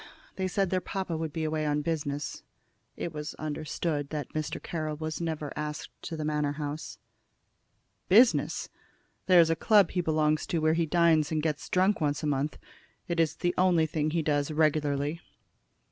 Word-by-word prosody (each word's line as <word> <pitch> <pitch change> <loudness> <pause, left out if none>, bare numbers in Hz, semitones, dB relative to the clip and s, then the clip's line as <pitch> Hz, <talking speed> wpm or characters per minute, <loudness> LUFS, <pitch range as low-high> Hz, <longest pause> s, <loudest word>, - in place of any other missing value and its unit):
They 190 -1 -1
said 195 0 0
their 185 -1 +1
papa 185 -2 -3
would 160 -1 -3
be 160 +2 -3
away 155 0 -1
on 150 0 0
business." 145 -2 -3 0.6
It 170 - -4
was 150 0 -5
understood 155 -1 -3
that 150 -4 -5
Mr. 155 -1 -3
Carroll 155 -2 -4
was 155 +1 -4
never 155 -3 -3
asked 150 0 -5
to 165 - -4
the 155 - -3
Manor 150 -1 0
house. 150 +1 -5 1.1
"Business! 230 +6 +4 0.6
There 180 -2 +7
is 165 -1 +5
a - - +2
club 205 0 +4
he 180 - 0
belongs 155 -2 +1
to 170 - -1
where 155 0 +3
he 165 0 +1
dines 165 -2 +3
and 155 -1 0
gets 155 -2 -2
drunk 190 +1 +2
once 145 0 0
a - - 0
month. 145 0 -1 0.5
It's 165 -2 +1
the 175 0 0
only 180 -3 +4
thing 155 -1 -1
he 165 +1 0
does 145 -1 +1
regularly." 150 0 +1
155 Hz, 175 wpm, -29 LUFS, 150-170 Hz, 1.1 s, There